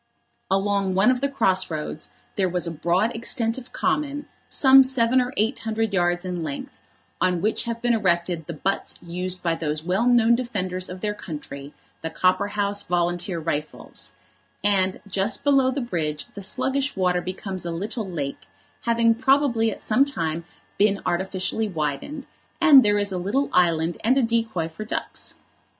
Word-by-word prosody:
Along 195 -1 +1
one 195 +6 +5
of 255 0 -1
the 280 - +1
cross 190 -9 +1
roads 155 -1 -5 0.3
there 190 -2 +1
was 180 0 -1
a 170 - -2
broad 175 +8 0
extent 230 +1 0
of 250 - -15
common, 290 0 -1 0.2
some 270 -1 +7
seven 260 -1 +3
or 250 0 -2
eight 225 +5 +1
hundred 220 -1 -2
yards 175 -1 +1
in 180 -2 -3
length, 150 -3 -6 0.4
on 180 -1 +2
which 215 +5 0
have 235 0 -4
been 240 0 +3
erected 175 -6 0
the 170 - -4
butts 190 +6 -2
used 180 +1 -4
by 170 -2 +1
those 155 -2 -2
well 190 +7 +1
known 235 -1 +5
defenders 190 -7 -2
of 180 0 -8
their 210 -1 -1
country, 145 -6 -8 0.3
the 160 - -3
Copperhouse 200 +4 +1
Volunteer 175 +1 -1
Rifles; 155 -2 -5 0.5
and 195 -2 +2
just 200 +3 -1
below 275 -2 +4
the 270 +2 -2
bridge 160 -10 -2
the 200 - -8
sluggish 265 +7 -1
water 180 -2 +1
becomes 185 +1 -5
a 175 - -3
little 205 +4 -4
lake, 145 -6 -5 0.4
having 230 -1 +4
probably 255 -2 +2
at 210 - -7
some 245 +5 +4
time 165 - -2 0.3
been 200 -1 +3
artificially 190 +4 -1
widened, 170 - -3 0.3
and 285 -4 +8
there 205 0 +3
is 205 -1 +1
a 185 - -2
little 230 +10 0
island 170 -1 +2
and 250 +5 +3
a 270 - +3
decoy 225 -7 0
for 165 +6 -8
ducks. 215 - -5
195 Hz, 165 wpm, -24 LUFS, 175-235 Hz, 0.5 s, and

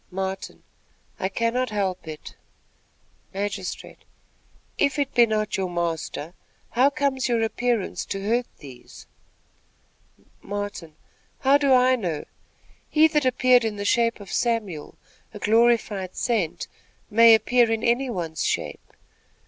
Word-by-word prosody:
Martin. 190 +1 -5 0.6
"I 190 - -1
cannot 230 +5 -1
help 195 -5 -2
it." 155 -1 -8 1.0
Magistrate. 195 -1 -5 0.8
"If 280 +1 +2
it 280 -1 -1
be 240 -1 +5
not 215 -1 -1
your 190 -1 -2
master, 170 -2 -3 0.4
how 255 +4 +4
comes 280 -3 -1
your 230 -2 +1
appearance 230 -2 -1
to 195 0 -5
hurt 240 +2 +1
these?" 130 -4 -13 1.4
Martin. 205 -6 -6 0.5
"How 275 +2 +4
do 280 -2 +2
I 255 0 +5
know? 175 -10 -4 0.6
He 310 +1 +5
that 300 -3 +1
appeared 255 -1 +4
in 220 -2 -2
the 205 0 -5
shape 230 +2 +2
of 200 -2 -11
Samuel, 215 -10 -2 0.4
a - - -5
glorified 215 -3 +1
saint, 215 -10 -1 0.4
may 230 +1 +8
appear 235 +1 +2
in 225 0 -1
any 250 +3 +1
one's 165 -8 -3
shape." - - -3
220 Hz, 125 wpm, -24 LUFS, 190-245 Hz, 1.4 s, may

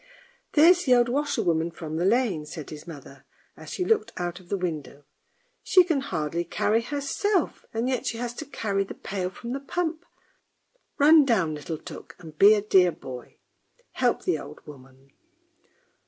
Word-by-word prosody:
" - - -37
There's 345 +4 +6
the 255 -2 +5
old 240 0 +3
washerwoman 220 - 0
from 160 -2 -6
the 175 - 0
lane," 200 -8 +1
said 150 -1 -8
his 150 +2 -10
mother, 140 -4 -11 0.3
as - - -11
she 365 - -3
looked 440 0 +1
out 175 0 -3
of 180 -1 -19
the 200 - 0
window. 155 -5 -5 0.3
" - - -44
She 365 - +6
can 325 -6 0
hardly 165 - -2
carry 210 +6 +1
herself, 290 - -1
and 230 +2 -2
yet 255 -2 -1
she 230 - -2
has 240 0 -4
to 310 - -6
carry 200 -7 -1
the 195 - -9
pail 185 -2 -4
from 235 +6 -7
the 275 - -3
pump; 320 +3 -3 0.9
run 305 +2 +7
down 195 - +1
little 150 +2 -5
Tuk - - -11
and 160 -3 -12
be 205 +6 +7
a 205 - -1
dear 185 -4 +4
boy. 130 -6 -10 0.5
Help - - 0
the - - 0
old - - -11
woman! 135 -1 -15
205 Hz, 180 wpm, -26 LUFS, -, 0.9 s, run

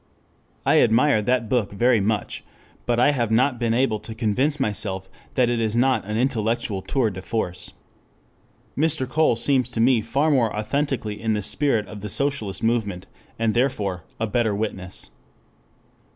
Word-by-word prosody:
I - - +5
admire 115 +1 +4
that 125 +1 0
book 110 -3 0
very 120 +3 +3
much; 105 +1 -2 0.4
but 120 -1 +1
I 145 +4 +5
have 120 -6 -1
not 125 +3 +2
been 115 -1 +1
able 120 -4 +1
to 110 +1 -9
convince 130 +7 0
myself 100 -5 -2 0.3
that 125 -2 +3
it 120 -1 0
is 110 0 0
not 130 -2 +2
an 105 0 -2
intellectual 115 -4 0
tour 120 +1 0
de 95 -1 -7
force. 90 -4 -4 1.0
Mr. 155 -3 +1
Cole 155 -1 +2
seems 125 +1 +1
to 120 - -5
me 120 0 +4
far 135 +8 +1
more 120 -7 +2
authentically 110 -2 -2
in 110 -1 0
the 105 - -2
spirit 120 -3 +2
of 105 -1 -9
the 105 - -5
socialist 115 -6 -1
movement, 105 -5 -1 0.3
and 115 -1 +1
therefore, 105 -9 -1 0.2
a 110 - 0
better 110 -1 0
witness. 95 -4 -3
115 Hz, 165 wpm, -23 LUFS, 105-130 Hz, 1.0 s, I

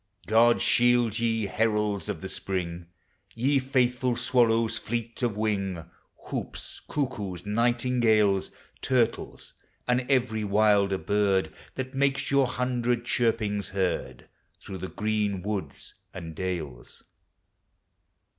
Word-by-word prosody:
God 115 +2 +4
shield 120 -2 +3
ye, 115 -2 +1
heralds 105 -1 0
of - - -4
the 95 - -5
spring! 90 -3 -3 0.5
Ye 135 +4 +2
faithful 125 -1 +1
swallows, 115 -2 +2
fleet 115 +2 -4
of 115 -4 0
wing, 100 -6 -1 0.4
Houps, - - -5
cuckoos, 105 - -3
nightingales, 115 -3 +2 0.3
Turtles, 120 -3 -1 0.3
and 125 0 +3
every 120 -5 +1
wilder 100 -1 +3
bird, 100 -5 +1 0.2
That 130 0 -4
make 135 0 +1
your 140 -2 +4
hundred 125 -1 -1
chirpings 110 -5 0
heard 95 -2 -2 0.3
Through 95 -1 -8
the 95 - -4
green 105 -3 -1
woods 105 -1 -4 0.2
and 85 -3 -7
dales. 80 -8 -5
110 Hz, 110 wpm, -27 LUFS, 100-120 Hz, 0.5 s, God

